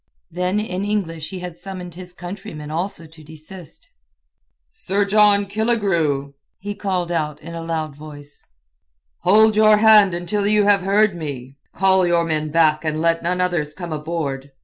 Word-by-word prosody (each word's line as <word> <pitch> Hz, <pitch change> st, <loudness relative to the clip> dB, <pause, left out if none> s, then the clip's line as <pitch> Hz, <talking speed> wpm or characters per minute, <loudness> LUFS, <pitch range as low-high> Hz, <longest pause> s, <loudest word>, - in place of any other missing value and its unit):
Then 180 Hz, +4 st, -1 dB
in 195 Hz, -3 st, -3 dB
English 165 Hz, -7 st, -3 dB
he 185 Hz, -2 st, -7 dB
had 180 Hz, -2 st, -8 dB
summoned 185 Hz, -3 st, -8 dB
his 180 Hz, +1 st, -10 dB
countrymen 175 Hz, -4 st, -8 dB
also 170 Hz, +1 st, -3 dB
to 160 Hz, 0 st, -16 dB
desist. 160 Hz, +2 st, -12 dB, 0.8 s
"Sir 200 Hz, +2 st, -2 dB
John 205 Hz, 0 st, +4 dB
Killigrew!" 190 Hz, -10 st, 0 dB, 0.2 s
he 205 Hz, +1 st, -6 dB
called 185 Hz, -4 st, -3 dB, 0.3 s
in 170 Hz, +2 st, -10 dB
a 165 Hz, -, -5 dB
loud 160 Hz, -3 st, -4 dB
voice. 145 Hz, -1 st, -9 dB, 0.7 s
"Hold 215 Hz, +3 st, +4 dB
your 215 Hz, 0 st, +5 dB
hand 210 Hz, -4 st, +6 dB
until 200 Hz, +4 st, -1 dB
you 210 Hz, 0 st, +4 dB
have 200 Hz, -1 st, +4 dB
heard 200 Hz, +1 st, +2 dB
me! 140 Hz, -5 st, -7 dB, 0.2 s
Call 190 Hz, -1 st, +4 dB
your 170 Hz, -1 st, +2 dB
men 155 Hz, -1 st, 0 dB
back 155 Hz, -1 st, +2 dB
and 155 Hz, -1 st, -1 dB
let 165 Hz, 0 st, +2 dB
none 180 Hz, +2 st, -1 dB
others 170 Hz, -5 st, -1 dB
come 175 Hz, -3 st, -6 dB
aboard! 150 Hz, -3 st, -4 dB
175 Hz, 155 wpm, -20 LUFS, 155-200 Hz, 0.8 s, hand